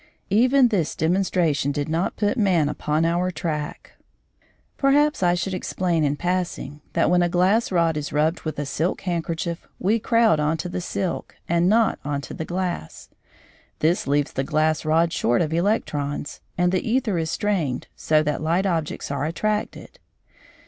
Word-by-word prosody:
Even 250 Hz, +4 st, +5 dB
this 185 Hz, -9 st, 0 dB
demonstration 165 Hz, -4 st, +1 dB
did 145 Hz, 0 st, -2 dB
not 165 Hz, +4 st, -1 dB
put 205 Hz, -1 st, 0 dB
man 185 Hz, -, +2 dB
upon 150 Hz, +2 st, 0 dB
our 175 Hz, +2 st, +1 dB
track. 155 Hz, -4 st, -4 dB, 0.8 s
Perhaps 290 Hz, 0 st, +3 dB
I 175 Hz, -1 st, +3 dB
should 190 Hz, +2 st, -2 dB
explain 180 Hz, -3 st, -1 dB
in 145 Hz, 0 st, +1 dB
passing, 175 Hz, -4 st, -3 dB
that -, -, +2 dB
when 180 Hz, 0 st, +4 dB
a 175 Hz, -, +2 dB
glass 190 Hz, +7 st, +2 dB
rod 170 Hz, -3 st, +2 dB
is 145 Hz, -, -4 dB
rubbed 155 Hz, +3 st, +1 dB
with 155 Hz, -, -5 dB
a 145 Hz, -, -2 dB
silk 160 Hz, +5 st, -1 dB
handkerchief 170 Hz, -1 st, -3 dB
we 215 Hz, +5 st, +1 dB
crowd 225 Hz, -6 st, +3 dB
on 150 Hz, +2 st, +1 dB
to 180 Hz, -, -4 dB
the 180 Hz, -, -3 dB
silk, 185 Hz, 0 st, -3 dB
and 170 Hz, +1 st, +2 dB
not 225 Hz, +1 st, +3 dB
on 145 Hz, 0 st, -2 dB
to -, -, -8 dB
the 160 Hz, -, -5 dB
glass. 175 Hz, -, -4 dB, 0.7 s
This 165 Hz, +1 st, +1 dB
leaves 145 Hz, 0 st, +1 dB
the 135 Hz, -, -1 dB
glass 155 Hz, +2 st, +1 dB
rod 165 Hz, +2 st, +2 dB
short 120 Hz, 0 st, +1 dB
of 160 Hz, -1 st, 0 dB
electrons, 150 Hz, -6 st, -1 dB, 0.2 s
and 180 Hz, 0 st, +2 dB
the 185 Hz, -, +1 dB
æther 225 Hz, -7 st, 0 dB
is 160 Hz, -, -3 dB
strained 165 Hz, -11 st, -1 dB
so 155 Hz, 0 st, +2 dB
that 150 Hz, 0 st, -1 dB
light 170 Hz, +5 st, +1 dB
objects 165 Hz, -6 st, -2 dB
are 140 Hz, 0 st, -1 dB
attracted. 215 Hz, -, -3 dB
170 Hz, 170 wpm, -23 LUFS, 155-190 Hz, 0.8 s, Even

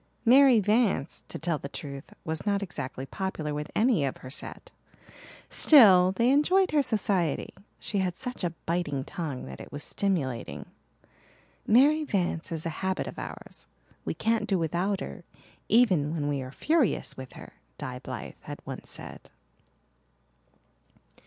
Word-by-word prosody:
Mary 260 Hz, 0 st, +7 dB
Vance, 210 Hz, -, +1 dB
to -, -, -6 dB
tell 165 Hz, -2 st, -1 dB
the 140 Hz, -, -7 dB
truth, 140 Hz, -1 st, -8 dB
was 160 Hz, 0 st, -2 dB
not 200 Hz, -1 st, 0 dB
exactly 135 Hz, -7 st, -5 dB
popular 160 Hz, -3 st, -4 dB
with 150 Hz, +1 st, -4 dB
any 220 Hz, -, +3 dB
of 135 Hz, -, -2 dB
her 130 Hz, -, -10 dB
set. 155 Hz, -, -6 dB, 0.8 s
Still, 190 Hz, -, +7 dB
they 235 Hz, +6 st, +3 dB
enjoyed 365 Hz, +7 st, +3 dB
her 300 Hz, -1 st, +4 dB
society 205 Hz, -, 0 dB, 0.2 s
she 205 Hz, -, -3 dB
had 185 Hz, -2 st, -1 dB
such 250 Hz, -5 st, -5 dB
a 170 Hz, -1 st, -1 dB
biting 160 Hz, -5 st, -1 dB
tongue 145 Hz, -4 st, -5 dB
that 65 Hz, 0 st, -9 dB
it -, -, -11 dB
was 145 Hz, -, -5 dB
stimulating. 145 Hz, -12 st, -2 dB, 1.0 s
"Mary 285 Hz, +7 st, +5 dB
Vance 180 Hz, -, -1 dB
is 160 Hz, -1 st, -4 dB
a -, -, 0 dB
habit 190 Hz, 0 st, -1 dB
of -, -, -7 dB
ours -, -, -9 dB, 0.4 s
we -, -, -3 dB
can't 225 Hz, -1 st, 0 dB
do 195 Hz, -, +2 dB
without 180 Hz, +4 st, -1 dB
her -, -, -7 dB, 0.5 s
even 185 Hz, -11 st, +4 dB
when 145 Hz, -3 st, -1 dB
we 140 Hz, -2 st, -1 dB
are 130 Hz, 0 st, -7 dB
furious 305 Hz, -, +1 dB
with 130 Hz, -1 st, -9 dB
her," -, -, -12 dB, 0.2 s
Di -, -, -5 dB
Blythe -, -, -7 dB
had -, -, -8 dB
once -, -, -6 dB
said. -, -, -8 dB
185 Hz, 150 wpm, -28 LUFS, 150-225 Hz, 1.0 s, Mary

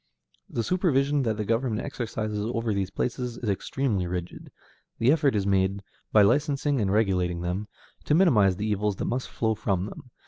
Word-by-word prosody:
The 115 Hz, -, -2 dB
supervision 145 Hz, -, +2 dB
that 110 Hz, -4 st, -1 dB
the 105 Hz, -, -2 dB
government 115 Hz, 0 st, 0 dB
exercises 110 Hz, -6 st, -3 dB
over 115 Hz, -1 st, -1 dB
these 95 Hz, -2 st, -1 dB
places 125 Hz, +1 st, -3 dB
is 120 Hz, -, -5 dB
extremely 100 Hz, -1 st, -1 dB
rigid; 90 Hz, 0 st, -6 dB, 0.5 s
the 115 Hz, +4 st, +4 dB
effort 145 Hz, -5 st, +2 dB
is 100 Hz, -2 st, 0 dB
made, 95 Hz, 0 st, +1 dB, 0.3 s
by 105 Hz, -, +6 dB
licensing 140 Hz, +3 st, +2 dB
and 95 Hz, -2 st, +1 dB
regulating 90 Hz, -5 st, +1 dB
them, 90 Hz, +4 st, -3 dB, 0.4 s
to 150 Hz, -, +3 dB
minimize 110 Hz, -, +4 dB
the 105 Hz, -, -3 dB
evils 105 Hz, -1 st, 0 dB
that -, -, -4 dB
must 125 Hz, +1 st, -2 dB
flow 110 Hz, -1 st, 0 dB
from 100 Hz, -4 st, -1 dB
them. 115 Hz, +4 st, -10 dB
110 Hz, 175 wpm, -26 LUFS, 100-130 Hz, 0.5 s, by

